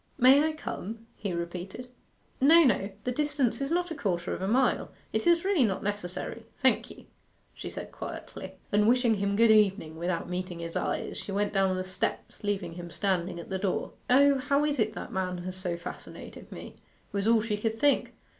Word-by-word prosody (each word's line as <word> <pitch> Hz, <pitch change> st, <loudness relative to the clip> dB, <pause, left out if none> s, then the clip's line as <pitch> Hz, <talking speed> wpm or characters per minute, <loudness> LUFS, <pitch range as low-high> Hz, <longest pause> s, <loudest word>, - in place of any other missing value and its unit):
'May 265 Hz, +4 st, +7 dB
I 315 Hz, 0 st, +1 dB
come?' 230 Hz, -7 st, -6 dB
he 200 Hz, -2 st, -4 dB
repeated. 175 Hz, +7 st, -5 dB, 0.5 s
'No, 325 Hz, +5 st, +8 dB
no. 210 Hz, -7 st, +2 dB
The 250 Hz, -, -1 dB
distance 285 Hz, -2 st, 0 dB
is 275 Hz, -, -1 dB
not 350 Hz, +1 st, 0 dB
a -, -, -3 dB
quarter 180 Hz, -7 st, -1 dB
of -, -, -5 dB
a 190 Hz, -, -1 dB
mile 255 Hz, +5 st, +2 dB, 0.2 s
it -, -, 0 dB
is 340 Hz, +1 st, +4 dB
really 385 Hz, -8 st, +3 dB
not 195 Hz, -4 st, 0 dB
necessary, 205 Hz, +3 st, -4 dB
thank 260 Hz, -, +2 dB
you,' -, -, -13 dB, 0.5 s
she -, -, -7 dB
said -, -, -7 dB
quietly. -, -, -7 dB, 0.2 s
And 210 Hz, +1 st, +4 dB
wishing 245 Hz, -1 st, +4 dB
him 200 Hz, 0 st, 0 dB
good 230 Hz, +1 st, +6 dB
evening, 195 Hz, -7 st, +3 dB
without 170 Hz, 0 st, -2 dB
meeting 180 Hz, 0 st, -4 dB
his 165 Hz, 0 st, -6 dB
eyes, -, -, -2 dB
she -, -, -6 dB
went 205 Hz, +1 st, 0 dB
down 190 Hz, -1 st, +2 dB
the 185 Hz, -, -1 dB
steps, 185 Hz, +3 st, -3 dB
leaving 195 Hz, -5 st, -2 dB
him 175 Hz, 0 st, -7 dB
standing 180 Hz, -1 st, -1 dB
at 170 Hz, -, -9 dB
the 190 Hz, -1 st, -2 dB
door. 190 Hz, -1 st, -1 dB, 0.2 s
'O, 280 Hz, +2 st, +6 dB
how 280 Hz, +2 st, +2 dB
is 290 Hz, -2 st, -1 dB
it 215 Hz, 0 st, +1 dB
that -, -, -7 dB
man 185 Hz, -2 st, -1 dB
has 185 Hz, 0 st, -5 dB
so 180 Hz, -2 st, -3 dB
fascinated 170 Hz, -, -9 dB
me?' -, -, -9 dB, 0.3 s
was 200 Hz, +1 st, -1 dB
all 225 Hz, -1 st, +4 dB
she 220 Hz, -2 st, -1 dB
could 220 Hz, +1 st, -1 dB
think. 285 Hz, +4 st, +2 dB
205 Hz, 200 wpm, -29 LUFS, 185-255 Hz, 0.5 s, No